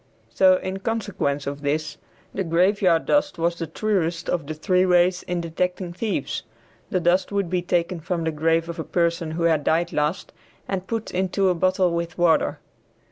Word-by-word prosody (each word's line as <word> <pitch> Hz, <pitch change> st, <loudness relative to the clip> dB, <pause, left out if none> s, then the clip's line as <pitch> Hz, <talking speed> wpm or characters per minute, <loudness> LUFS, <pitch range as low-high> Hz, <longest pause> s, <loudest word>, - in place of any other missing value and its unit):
So 280 Hz, -1 st, +5 dB
in 190 Hz, -5 st, -4 dB
consequence 190 Hz, -10 st, -2 dB
of 140 Hz, +1 st, -5 dB
this, 150 Hz, +2 st, -2 dB, 0.4 s
the 195 Hz, -, -1 dB
graveyard 180 Hz, 0 st, +2 dB
dust 290 Hz, -4 st, +1 dB
was 170 Hz, +1 st, 0 dB
the 165 Hz, -, -3 dB
truest 175 Hz, -2 st, -1 dB
of 165 Hz, -5 st, -2 dB
the 155 Hz, -, -4 dB
three 180 Hz, +4 st, +2 dB
ways 180 Hz, 0 st, +3 dB
in 175 Hz, -1 st, -3 dB
detecting 180 Hz, +2 st, -2 dB
thieves. 190 Hz, -6 st, -2 dB, 0.5 s
The 185 Hz, -, +1 dB
dust 180 Hz, +3 st, +2 dB
would 200 Hz, -4 st, -1 dB
be 180 Hz, -1 st, +1 dB
taken 175 Hz, 0 st, -1 dB
from 170 Hz, +1 st, -3 dB
the 160 Hz, -, 0 dB
grave 165 Hz, +2 st, +1 dB
of 170 Hz, 0 st, -6 dB
a -, -, -2 dB
person 170 Hz, -1 st, 0 dB
who 165 Hz, +2 st, -3 dB
had 160 Hz, -3 st, +2 dB
died 165 Hz, +3 st, +1 dB
last 150 Hz, +5 st, -1 dB, 0.3 s
and 190 Hz, -1 st, -3 dB
put 225 Hz, -1 st, -3 dB
into 190 Hz, +1 st, +1 dB
a -, -, +3 dB
bottle 185 Hz, +1 st, +2 dB
with 170 Hz, 0 st, -3 dB
water. 175 Hz, -2 st, +3 dB
175 Hz, 185 wpm, -23 LUFS, 165-185 Hz, 0.5 s, So